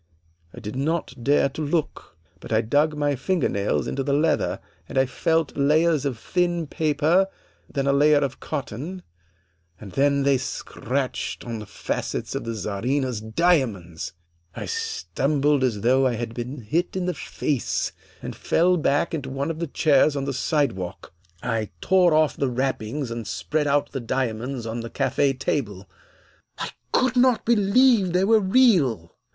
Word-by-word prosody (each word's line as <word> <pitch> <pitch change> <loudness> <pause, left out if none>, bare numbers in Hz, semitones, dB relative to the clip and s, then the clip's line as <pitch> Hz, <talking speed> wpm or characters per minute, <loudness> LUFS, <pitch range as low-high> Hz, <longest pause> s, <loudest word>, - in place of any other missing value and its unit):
I - - -10
did 105 +2 -6
not 155 +1 -1
dare 140 +1 +4
to 140 - -7
look, 150 - -2 0.2
but - - -11
I 110 0 +3
dug 145 +7 +1
my 145 -1 +1
finger 185 +6 0
nails 100 +1 0
into 135 - -2
the 140 +1 0
leather 155 +3 +1 0.3
and - - -5
I 130 - +5
felt 160 +4 0
layers 150 +1 +3
of 130 -5 -1
thin 175 +5 0
paper, 155 +4 +2 0.4
then 140 -2 -1
a 140 - +3
layer 150 +1 +5
of 140 -2 -1
cotton, 155 - -5 0.8
and 100 -3 -10
then 140 +2 +2
they 140 -1 +3
scratched 135 0 -3
on 115 -2 -4
the 105 - -9
facets - - -4
of - - -4
the 115 0 -3
Czarina's 115 +4 -2
diamonds! 110 - 0 0.4
"I - - -5
stumbled 150 - 0
as 115 -6 0
though 130 +4 +4
I 125 - 0
had 115 0 -4
been 125 +3 -5
hit 160 - -1
in 185 -1 -1
the 180 - 0
face, 145 -3 -2 0.3
and - - -5
fell 180 +2 +2
back 145 +1 +1
into 140 -4 -3
one 140 +4 -2
of 160 - -7
the 170 - -2
chairs 145 0 +3
on 140 -1 -2
the 140 - -2
sidewalk. 115 - -2 0.3
I 115 -3 -1
tore 180 -4 +4
off 155 -1 +3
the 135 - 0
wrappings 130 0 -2
and 115 -2 -5
spread 155 -1 -1
out 145 0 +1
the 135 - -3
diamonds 120 0 -2
on 115 +1 -4
the 115 0 -6
cafe 140 +3 +1
table; 105 -8 -3 0.7
I - - -4 0.2
could 255 0 +2
not 250 -2 +3
believe 220 -2 +4
they 180 +1 +3
were 220 +2 +5
real. 185 - +3
140 Hz, 165 wpm, -24 LUFS, 120-165 Hz, 0.8 s, I